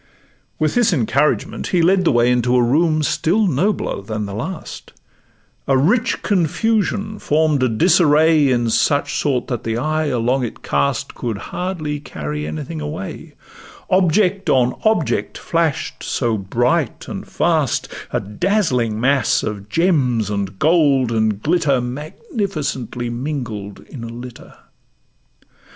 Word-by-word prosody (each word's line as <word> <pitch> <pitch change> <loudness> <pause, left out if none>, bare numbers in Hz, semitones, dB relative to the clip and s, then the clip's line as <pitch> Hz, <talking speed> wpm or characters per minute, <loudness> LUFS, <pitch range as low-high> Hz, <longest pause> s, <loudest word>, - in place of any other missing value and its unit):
With 155 -1 0
this 240 -4 +3
encouragement, 140 +2 0
he 175 -3 +2
led 185 +1 +3
the - - +4
way 120 -1 +3
Into 125 0 +2
a 125 - +4
room 155 +5 +2
still 165 +9 +1
nobler 180 - 0
than 105 +1 -4
the 100 - -6
last; 160 - -6 0.7
A 135 - +3
rich 220 - +1
confusion 210 +3 0
form'd 150 -2 +1
a 130 - +3
disarray 155 +2 +4
In 120 -2 +1
such 145 +4 +1
sort, 130 -5 0
that 120 -4 -4
the 115 0 -2
eye 155 +4 0
along 125 0 0
it 120 - -6
cast 70 -1 -1
Could 115 -4 -4 0.2
hardly 160 -5 -3
carry 75 - -5
anything 75 0 -5
away, 75 +6 -6 0.6
Object 185 +1 +2
on 125 -1 +3
object 220 -8 +1
flash'd 165 -3 -1
so 120 -4 -1
bright 120 - -1
and - - -6
fast; - - 0 0.2
A - - 0
dazzling 125 - 0
mass 135 +2 +2
of 105 -1 -5
gems, 125 - +1
and 100 -1 -3
gold, 140 - +3
and 110 -2 0
glitter, 150 -5 +2
Magnificently 140 - -4
mingled 120 -6 -5
in 125 -5 -10
a - - -5
litter. 120 +1 -10
140 Hz, 135 wpm, -19 LUFS, 115-165 Hz, 0.7 s, the